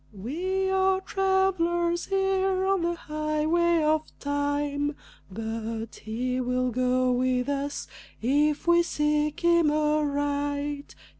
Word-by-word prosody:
We 350 - -2
are 380 0 +2
travelers 375 -3 +1
here 385 -1 +1
on 390 -1 +2
the 345 0 0
highway 310 +2 0
of 310 0 +3 0.2
time, 285 0 -1 0.3
But 225 +2 -5
he 250 +4 -3
will 250 0 0
go 255 +1 +1
with 250 0 +1
us 285 0 -2 0.3
if 290 +5 +1
we 345 0 +5
seek 300 -2 0
him 340 -2 +4
aright. 290 -1 -1
300 Hz, 105 wpm, -26 LUFS, 255-345 Hz, 0.3 s, we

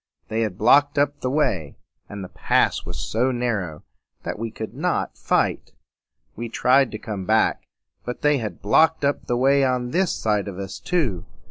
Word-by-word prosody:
They 110 +1 -1
had 105 -5 -2
blocked 145 +4 +4
up 145 0 +1
the 130 - -2
way; 95 - 0 0.3
and 100 -1 -7
the - - -6
pass - - +1
was - - -5
so 120 +4 0
narrow 105 -11 -2 0.4
that - - -4
we 115 0 -3
could 110 0 -7
not - - -1
fight. - - 0 0.6
We 120 +1 -5
tried 130 +3 +3
to - - -3
come 105 -4 -6
back; 110 +2 +1 0.4
but 125 - -6
they 150 -2 +3
had 105 -7 -6
blocked 160 +8 +3
up 140 - -1
the 120 - 0
way 135 +2 +4
on 125 -2 0
this 185 +1 +1
side 105 -2 0
of 95 -2 -6
us 95 0 -6
too. 135 - -1
120 Hz, 185 wpm, -23 LUFS, 105-140 Hz, 0.6 s, blocked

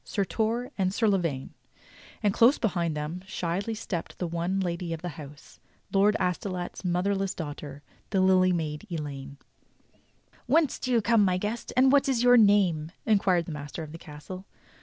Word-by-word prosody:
Sir 200 -2 -1
Torre 230 +5 -1
and 185 -1 +2
Sir 220 +3 +1
La 195 -2 +3
vaine; 140 -7 -3 0.7
and 205 -2 +3
close 240 +7 +5
behind 175 -7 -1
them 155 +4 -4
shyly 195 +3 -2
stepped 185 -5 -5
the 180 - -2
one 170 +3 -1
lady 175 -2 -2
of 165 +1 -7
the 175 - -2
house. 150 -2 -12 0.3
Lord 205 +2 +4
Astolat's 180 0 -3
mo 180 0 0
therless 195 -1 0
daughter 145 -2 -7
— - - -35
the 195 - +1
Lily 185 -1 +4
Maid 160 +1 -3
Elaine. 140 -4 -6 1.1
"Whence 300 +2 +2
do 255 - -3
you 230 -3 +3
come, 230 -1 +4
my 185 -2 +2
guest, 210 +5 -4
and 260 +1 +6
what 280 0 +4
is 245 -3 +1
your 245 0 +7
nanie.?^" 200 -8 +4 0.2
in 215 -2 +4
quired 180 -4 +2
the 165 - -7
master 150 +2 -6
of 150 - -9
the 165 - -9
castle. 175 +5 -10
185 Hz, 185 wpm, -27 LUFS, 165-210 Hz, 1.1 s, your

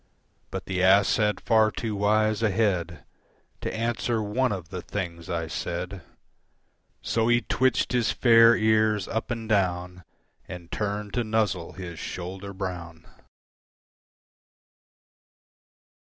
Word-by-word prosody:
But - - -5
the 95 -1 -2
ass 95 +2 +5
had 105 -2 +1
far 110 -2 +3
too 110 -1 -4
wise 110 +1 +2
a 110 - +3
head 90 -6 -1 0.6
To - - -3
answer 115 +1 -1
one 125 +4 0
of 90 -5 -5
the 90 -1 -5
things 85 -5 -5
I 85 -1 -2
said, 90 +3 -4 1.0
So 115 -1 +1
he 120 0 +4
twitched 130 0 +1
his 125 -2 +1
fair 115 -1 +6
ears 110 -2 +2
up 110 - -3
and 115 -2 -4
down 90 -3 0 0.4
And 90 -2 -9
turned 105 -1 -3
to 120 - 0
nuzzle 105 -6 -1
his 85 -2 -8
shoulder 95 +2 -6
brown. 90 -4 -6
100 Hz, 125 wpm, -26 LUFS, 90-110 Hz, 1.0 s, fair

